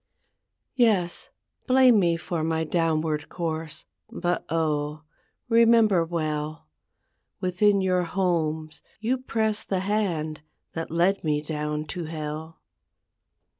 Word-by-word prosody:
Yes, 210 -9 +1 0.4
blame 255 -3 +6
me 170 -3 +2
for 165 0 -3
my 160 0 0
downward 160 -2 0
course, 160 -2 -4 0.2
But 175 0 -1
oh! 155 -1 -1 0.4
remember 230 -5 +5
well, 155 -2 -3 0.7
Within 195 +2 +2
your 180 -1 +1
homes 160 -3 -1 0.2
you 245 +4 0
press 220 -4 0
the 190 -2 -1
hand 175 -7 -1 0.3
That 165 0 -4
led 175 +4 +2
me 150 -2 0
down 150 0 -3
to 170 +3 -5
hell. 155 0 -6
165 Hz, 105 wpm, -26 LUFS, 155-195 Hz, 0.7 s, blame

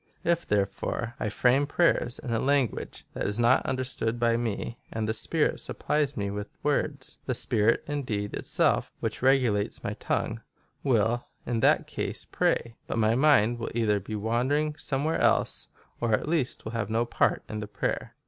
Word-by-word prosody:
" - - -38
If, 170 0 -5
therefore, 105 +3 -1
I - - -1
frame 130 +6 +3
prayers 155 -6 +2
in 130 -6 -6
a 115 - +1
lan 140 +1 +3
guage - - -8
that - - -2
is 105 +3 0
not 120 +2 +4
understood 125 -3 -1
by 115 -1 +3
me, 115 0 -3
and 110 -1 -2
the 110 - +1
spirit 150 +8 0
supplies 145 -2 -1
me 100 -1 -1
with 105 +1 -6
words, 145 -1 -1
the 130 - 0
spirit 115 -1 +2
indeed 115 -9 -3
itself, - - +1
which - - -3
regulates 125 -6 +2
my - - -2
tongue, 110 +1 -2 0.4
will 120 -2 +2 0.2
in 120 -2 -1
that - - +4
case - - -4
pray, 115 -1 0
but - - -2
my 110 0 +3
mind 120 -4 +4
will 115 - -3
either 105 -3 +2
be 105 +3 -6
wandering 130 +8 0
somewhere 145 +1 -1
else, - - +2 0.3
or 115 -2 0
at 105 - +1
least 155 -6 -1
will 110 - -4
have 115 -3 -2
no 115 +2 +1
part - - +1
in 110 - -4
the 105 - -5
prayer." - - -3
120 Hz, 180 wpm, -28 LUFS, 110-135 Hz, 0.4 s, not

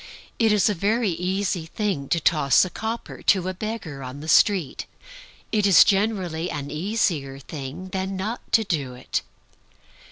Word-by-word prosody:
It 225 -2 +4
is 210 -2 +4
a 210 - +2
very 210 +3 +1
easy 180 0 -2
thing 180 -8 -2
to 170 - +2
toss 150 -2 +4
a 185 - -7
copper 225 +1 -5
to 185 -3 +3
a 185 - -2
beggar 185 -8 -5
on 130 +2 -7
the 155 - -8
street; 180 -2 +3 0.6
it 210 -2 +2
is 190 - +8
generally 190 -5 0
an 145 -2 -5
easier 155 -5 -1
thing 145 +6 -7
than 190 +1 -3
not 215 +5 -5
to 225 - +5
do 145 -10 -2
it. 125 - -3
185 Hz, 160 wpm, -24 LUFS, 150-210 Hz, 0.6 s, is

